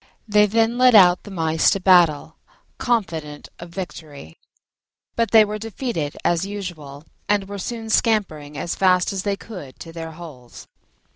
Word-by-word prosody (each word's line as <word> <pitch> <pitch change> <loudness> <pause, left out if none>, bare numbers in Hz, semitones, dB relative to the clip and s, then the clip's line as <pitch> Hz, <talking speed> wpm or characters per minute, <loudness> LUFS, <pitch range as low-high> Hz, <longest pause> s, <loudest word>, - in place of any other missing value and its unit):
They 210 0 +4
then 225 +3 +1
led 250 -2 +6
out 180 -3 +6
the - - -9
Mice 160 -4 +1
to 195 - 0
battle, 175 -6 +3 0.4
confident 165 - -2
of 170 - -9
victory: 150 - -9 0.8
but 230 -1 0
they 220 -1 +6
were 210 +1 -5
defeated 220 - -4
as 170 0 +1
usual, 175 -8 -7 0.3
and 205 -2 +1
were 200 0 -7
soon 225 +3 -5
scampering 155 -11 0
as 170 - -3
fast 185 0 +2
as 190 - -3
they 200 0 -1
could 180 - -11
to 165 - -10
their 165 -1 -7
holes. 150 -8 -12
185 Hz, 155 wpm, -21 LUFS, 160-210 Hz, 0.8 s, led